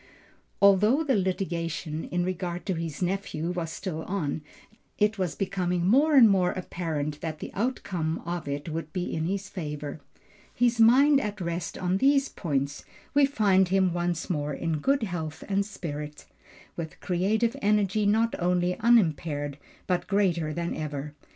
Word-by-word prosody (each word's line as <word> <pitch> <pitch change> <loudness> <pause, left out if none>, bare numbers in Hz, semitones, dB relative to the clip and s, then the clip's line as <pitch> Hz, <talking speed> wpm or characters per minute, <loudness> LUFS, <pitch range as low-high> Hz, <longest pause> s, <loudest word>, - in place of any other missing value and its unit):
Although 210 +9 +5
the 280 -4 +1
litigation, 170 -4 -2
in 175 0 -1
regard 180 -1 -3
to 190 - 0
his 165 -1 -4
nephew 180 -3 -2
was 175 -2 -3
still 175 -5 -4
on, 160 -6 -2 0.6
it 210 -1 +1
was 180 -3 -1
becoming 180 -3 -1
more 285 - +4
and 250 -5 +9
more 190 -3 +3
apparent 155 -5 -4
that 160 -2 -4
the - - -8
outcome 185 -8 -2
of 170 -2 -4
it 140 +2 -4
would 160 -1 -4
be 180 -1 -3
in 160 0 -1
his 195 +2 -2
favor. 150 -4 -6 0.5
His 240 -1 +2
mind 270 +5 +6
at 210 -2 -4
rest 170 -1 -3
on 180 +1 0
these 275 +4 +3
points, 140 -4 -2 0.3
we 285 -1 +5
find 195 -8 +3
him 190 -1 +2
once 175 -1 -1
more 150 -4 -2
in 160 0 -2
good 275 - +1
health 165 -6 -4
and 200 0 +1
spirits, 150 -7 -7 0.5
with 160 -2 -6
creative 215 +7 +1
energy 205 0 +2
not 225 +2 +2
only 180 +1 +1
unimpaired 160 - +2 0.3
but 180 -1 -1
greater 180 -6 +1
than 170 +2 -3
ever. 150 -1 -5
180 Hz, 155 wpm, -27 LUFS, 160-205 Hz, 0.6 s, and